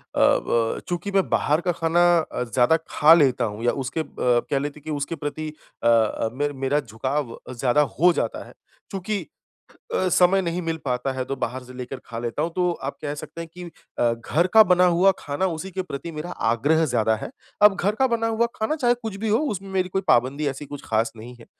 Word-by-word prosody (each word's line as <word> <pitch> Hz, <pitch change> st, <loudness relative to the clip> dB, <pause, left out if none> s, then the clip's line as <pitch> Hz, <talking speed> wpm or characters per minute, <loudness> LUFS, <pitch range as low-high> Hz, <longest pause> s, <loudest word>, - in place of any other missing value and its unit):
अ -, -, 0 dB, 0.3 s
ब 115 Hz, -1 st, 0 dB
चूँकि 180 Hz, +3 st, -3 dB
मैं 195 Hz, -1 st, +2 dB
बाहर 150 Hz, +4 st, +2 dB
का 180 Hz, -, 0 dB
खाना 165 Hz, 0 st, +1 dB, 0.2 s
अ, 155 Hz, -, -3 dB
ज़्यादा 125 Hz, +6 st, +3 dB
खा 155 Hz, +2 st, +6 dB
लेता 130 Hz, -7 st, +3 dB
हूँ 105 Hz, +2 st, -5 dB
या 120 Hz, -, +3 dB
उसके 140 Hz, +5 st, -2 dB
ब 120 Hz, -5 st, 0 dB
कह 140 Hz, -, +1 dB
लेते 145 Hz, +2 st, -5 dB
कि 155 Hz, +2 st, -7 dB
उसके 145 Hz, +2 st, -3 dB
प्रति 155 Hz, +1 st, -4 dB, 0.3 s
अ -, -, +3 dB
अ, 115 Hz, -1 st, +2 dB
मे 145 Hz, +3 st, -1 dB
मेरा 135 Hz, +2 st, 0 dB
झुकाव 130 Hz, +2 st, -3 dB
ज़्यादा 125 Hz, +3 st, +2 dB, 0.2 s
हो 180 Hz, +2 st, +6 dB
जाता -, -, -2 dB
है। -, -, -14 dB, 0.4 s
चूँकि 200 Hz, +1 st, -2 dB, 0.8 s
अ, 185 Hz, -, +1 dB
समय 180 Hz, +2 st, +4 dB
नहीं 175 Hz, 0 st, -2 dB
मिल 165 Hz, -1 st, -2 dB
पाता 125 Hz, 0 st, -1 dB
है 130 Hz, -1 st, -3 dB
तो 135 Hz, +1 st, -4 dB
बाहर 130 Hz, 0 st, -3 dB
से 125 Hz, -, -12 dB
लेकर 125 Hz, +1 st, -6 dB
खा 115 Hz, -, -6 dB
लेता 120 Hz, +5 st, -2 dB
हूँ, 165 Hz, -, -1 dB
तो 180 Hz, -1 st, +2 dB
आप 140 Hz, -4 st, -6 dB
कह 145 Hz, -1 st, -3 dB
सकते 150 Hz, +3 st, -8 dB
हैं 165 Hz, -, -6 dB
कि 180 Hz, 0 st, -8 dB, 0.3 s
अ, 120 Hz, -1 st, +3 dB
घर 145 Hz, +9 st, 0 dB
का 220 Hz, -, +10 dB
बना 180 Hz, -1 st, +4 dB
हुआ 180 Hz, +3 st, +4 dB
खाना 145 Hz, +6 st, -2 dB
उसी 180 Hz, +2 st, -4 dB
के 190 Hz, +1 st, -3 dB
प्रति 170 Hz, -2 st, -6 dB
मेरा 155 Hz, +3 st, -6 dB, 0.2 s
आग्रह 145 Hz, +8 st, +2 dB
ज़्यादा 110 Hz, -5 st, +1 dB
है। 110 Hz, -, -7 dB, 0.3 s
अब 210 Hz, -2 st, +7 dB
घर 200 Hz, +2 st, 0 dB
का 265 Hz, +4 st, +2 dB
बना 230 Hz, -2 st, 0 dB
हुआ 225 Hz, +1 st, +1 dB
खाना 220 Hz, +8 st, -1 dB
चाहे 245 Hz, -5 st, +2 dB
कुछ 225 Hz, -4 st, -6 dB
भी 220 Hz, +2 st, -3 dB
हो, 215 Hz, +2 st, +3 dB
उसमें 205 Hz, -10 st, -3 dB
मेरी 185 Hz, -1 st, 0 dB
कोई 190 Hz, +1 st, -2 dB
पाबंदी 140 Hz, +2 st, +2 dB
ऐसी 140 Hz, +2 st, -6 dB
कुछ 145 Hz, 0 st, -8 dB
खास 115 Hz, +1 st, 0 dB
नहीं 115 Hz, +3 st, -10 dB
है, -, -, -14 dB
150 Hz, 225 wpm, -23 LUFS, 125-180 Hz, 0.8 s, का